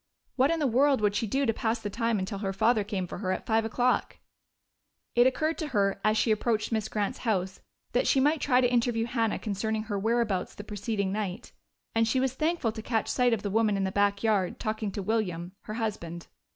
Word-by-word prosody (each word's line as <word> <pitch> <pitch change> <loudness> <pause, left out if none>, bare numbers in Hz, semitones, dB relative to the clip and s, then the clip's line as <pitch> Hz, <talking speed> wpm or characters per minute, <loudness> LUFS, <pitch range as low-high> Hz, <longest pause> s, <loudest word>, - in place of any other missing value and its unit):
What 270 +2 +3
in 330 - +1
the 305 - 0
world 270 +2 +3
would 210 -1 +2
she 225 +2 -1
do 270 +6 +1
to 225 - +2
pass 225 +2 0
the 210 -3 -5
time 230 +1 0
until 195 +1 -3
her 195 -2 -2
father 220 +2 +3
came 200 -3 -3
for 180 - -7
her 185 -2 -1
at 185 - -3
five 225 0 +2
o'clock? 245 +3 0 1.0
It 240 +1 +5
occurred 310 +5 0
to 315 - -2
her 200 -6 0
as 215 0 +3
she 225 - +2
approached 215 +1 0
Miss 220 -1 -1
Grant's 205 -2 -2
house 190 -5 -1 0.3
that 245 - +1
she 270 - +4
might 295 +3 +2
try 255 -2 +3
to 245 -1 +2
interview 235 -1 +2
Hannah 230 -2 0
concerning 220 +1 -2
her 205 -2 -3
whereabouts 220 -3 0
the 205 - -8
preceding 205 -1 -2
night, 200 -3 -4 0.4
and 225 0 +2
she 260 +3 +2
was 260 -1 0
thankful 310 -4 0
to 220 - -7
catch 225 -1 -1
sight 250 -1 +2
of 225 -3 0
the 200 - -2
woman 215 -1 +2
in 195 - 0
the 190 - -1
back 200 +1 +1
yard, 205 -5 +1
talking 215 -1 -2
to 200 - -4
William, 185 -5 -1
her 215 - -5
husband. 175 -7 -4
220 Hz, 225 wpm, -28 LUFS, 200-240 Hz, 1.0 s, It